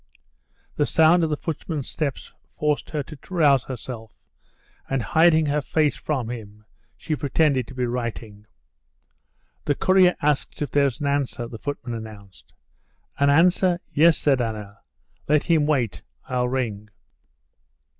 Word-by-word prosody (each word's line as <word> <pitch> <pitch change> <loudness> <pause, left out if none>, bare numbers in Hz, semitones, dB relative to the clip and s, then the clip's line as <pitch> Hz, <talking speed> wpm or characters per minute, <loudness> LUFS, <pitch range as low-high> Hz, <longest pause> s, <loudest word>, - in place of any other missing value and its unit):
The 145 - +2
sound 165 +2 +4
of 160 - +1
the 150 - -1
footman's 155 -3 -4
steps 145 -4 -4 0.2
forced 150 -1 -1
her 150 -2 -2
to 150 +2 -11
rouse 150 -8 +3
herself, 120 -3 -8 0.6
and, 135 -3 -1
hiding 160 +2 +4
her 150 0 0
face 150 -1 +1
from 130 -6 -3
him, 105 -3 -9 0.3
she 155 - -3
pretended 140 -3 +1
to 125 - -11
be 125 -1 -1
writing. 115 -3 -5 1.2
"The 145 - +1
courier 185 +1 +4
asks 145 -1 -1
if 145 - -3
there's 140 -3 +1
an - - -1
answer," 140 -4 -1
the 115 -2 -9
footman 130 -3 -5
announced. 100 -7 -10 0.7
"An 140 0 +4
answer? 175 +3 +3
Yes," 160 +2 +5
said 135 -4 +2
Anna. 105 -3 -5 0.5
"Let 150 0 +3
him 160 -4 +2
wait. 130 -8 0 0.3
I'll 125 -1 0
ring." 110 -5 -3
140 Hz, 140 wpm, -23 LUFS, 120-155 Hz, 1.2 s, Yes